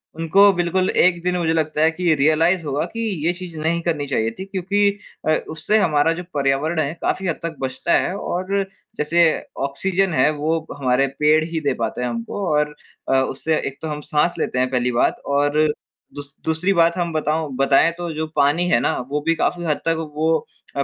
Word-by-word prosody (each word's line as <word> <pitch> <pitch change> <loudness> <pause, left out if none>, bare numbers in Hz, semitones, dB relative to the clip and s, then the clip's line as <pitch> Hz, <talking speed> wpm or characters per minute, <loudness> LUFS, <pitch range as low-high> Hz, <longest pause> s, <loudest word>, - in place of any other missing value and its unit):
उनको 190 +5 +5
बिल्कुल 175 +1 0
एक 175 -1 +3
दिन 180 0 0
मुझे 165 -2 +1
लगता 155 -1 0
है 160 +1 +4
कि 170 -1 +1
रियलाइज़ 160 +5 +3
होगा 145 +1 -1
कि 230 - -5 0.3
ये 175 - +2
चीज़ 175 -2 -9
नहीं 170 +2 0
करनी 160 -4 -1
चाहिए 115 -4 0
थी 190 - -4
क्योंकि 195 +1 0 0.4
अ, - - +4 0.2
उससे 160 +7 0
हमारा 165 -4 +3
जो - - -5
पर्यावरण 140 +4 0
है 150 0 0
काफ़ी 190 -1 -1
हद 165 - -2
तक 165 -1 -4
बचता 130 -1 -1
है 185 - -1
और 195 +2 -2 0.4
जैसे 170 +3 +3 0.4
ऑक्सीज़न 185 +5 0
है 150 - +4
वो 155 +2 -1 0.2
हमारे 130 0 +2
पेड़ 155 +1 +4
ही 165 0 -3
दे 140 -2 +1
पाते 115 +2 -2
हैं 125 - -1
हमको 120 - -4
और 150 0 0 0.3
अ, - - +3
उससे 155 +4 -1
एक 135 - -4
तो 160 - -4
हम 150 -1 -4
साँस 160 +3 +2
लेते 125 - -1
हैं 130 0 +1
पहली 125 -1 +1
बात 120 - +1 0.2
और 145 +2 +3 0.5
दूस 145 -1 -9
दूसरी 160 +5 +1
बात 170 0 +3
हम 170 -1 -1
बताऊँ 155 0 -1
बताएँ 135 +4 +4
तो 175 -1 -4
जो 160 +1 -2
पानी 155 +5 +2
है 115 - +4
ना - - 0
वो 150 +1 -1
भी 165 +2 +1
काफ़ी 175 +2 -1
हद 150 -2 +1
तक 165 0 +2 0.2
वो 155 +2 +1 0.5
अ, 140 - +1
160 Hz, 205 wpm, -21 LUFS, 145-175 Hz, 0.5 s, उनको